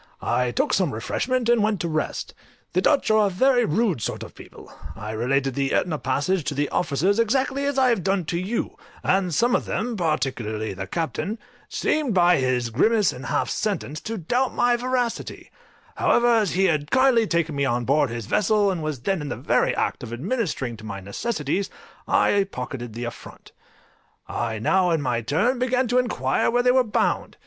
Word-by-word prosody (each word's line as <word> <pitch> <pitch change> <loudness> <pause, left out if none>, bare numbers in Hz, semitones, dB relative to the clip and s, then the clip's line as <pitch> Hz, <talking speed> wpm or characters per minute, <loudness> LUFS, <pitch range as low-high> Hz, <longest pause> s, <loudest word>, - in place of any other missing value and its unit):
I 125 -1 +1
took 120 - 0
some 185 - +1
refreshment, 245 - -1
and 240 -2 +4
went 210 -2 +1
to 170 - -1
rest. 155 -1 -3 0.4
The - - +2
Dutch 285 -6 +2
are 215 -1 +4
a - - 0
very 245 +6 +3
rude 195 - 0
sort - - -3
of - - -11
people; - - -14 0.2
I 105 +1 -6
related 135 +4 0
the 135 +1 -1
Etna 155 -4 0
passage 145 +7 0
to 145 - -2
the 145 +1 0
officers, 180 +6 +1
exactly 265 +4 +1
as 280 -1 -1
I 260 -1 +4
have 230 -7 +1
done 190 -2 0
to 170 +2 -2
you, 200 +6 -3 0.3
and 185 -1 +1
some 235 +10 +2
of - - 0
them, 240 +1 -2
particularly 125 - -2
the 95 0 -6
Captain, 175 +6 -3 0.3
seemed 290 -9 0
by 175 -1 +5
his 125 -3 0
grimace 210 - +3
and 125 - -8
half - - 0
sentence 195 -8 -2
to 225 0 -4
doubt 245 +9 -1
my 245 0 +3
veracity; 245 -1 -3 0.5
however, 240 0 +3
as 215 -5 +2
he 190 +2 +2
had 150 -4 0
kindly 260 -4 +4
taken 165 -4 0
me 140 0 +1
on 120 -2 0
board 145 +1 +2
his 115 -2 -5
vessel, 210 - +2
and 180 -3 -3
was 155 -5 -4
then 190 +5 -1
in 145 - -5
the - - -3
very - - +1
act - - -1
of - - -7
administering 145 - -2
to 110 - -13
my 105 -3 -6
necessities, 155 - -2 0.4
I 200 -1 +3
pocketed 125 -3 -6
the 120 +2 -5
affront. 120 -1 -9 0.8
I 115 -2 -3
now 180 - +2
in 165 -3 +1
my 120 -3 0
turn 185 - +1
began 255 0 +1
to 250 +1 +3
inquire 135 - 0
where 245 +1 +2
they 250 - +5
were 260 0 +4
bound? 220 - -1
180 Hz, 195 wpm, -24 LUFS, -, 0.8 s, by